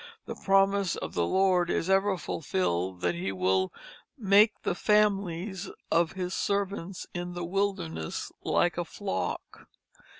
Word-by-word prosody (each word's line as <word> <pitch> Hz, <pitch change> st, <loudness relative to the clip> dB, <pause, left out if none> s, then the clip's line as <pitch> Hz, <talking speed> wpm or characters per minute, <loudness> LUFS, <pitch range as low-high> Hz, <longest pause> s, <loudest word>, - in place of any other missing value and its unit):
The -, -, -5 dB
promise 195 Hz, -1 st, +2 dB
of -, -, -6 dB
the 85 Hz, -1 st, +1 dB
Lord 185 Hz, -2 st, +3 dB
is 165 Hz, -, 0 dB
ever 195 Hz, 0 st, +3 dB
fulfilled 95 Hz, -, -2 dB
that 90 Hz, -1 st, +1 dB
he 90 Hz, +3 st, -3 dB
will 95 Hz, 0 st, +1 dB, 0.5 s
"make 210 Hz, -1 st, +4 dB
the -, -, 0 dB
families 195 Hz, -2 st, +1 dB, 0.2 s
of 165 Hz, -1 st, +3 dB
his 185 Hz, -1 st, -3 dB
servants 200 Hz, -2 st, -2 dB
in 175 Hz, 0 st, -4 dB
the 175 Hz, -1 st, -3 dB
wilderness 170 Hz, -, -2 dB
like 175 Hz, 0 st, +1 dB
a 175 Hz, -, -1 dB
flock." 195 Hz, +4 st, -4 dB
180 Hz, 135 wpm, -28 LUFS, 160-195 Hz, 0.5 s, make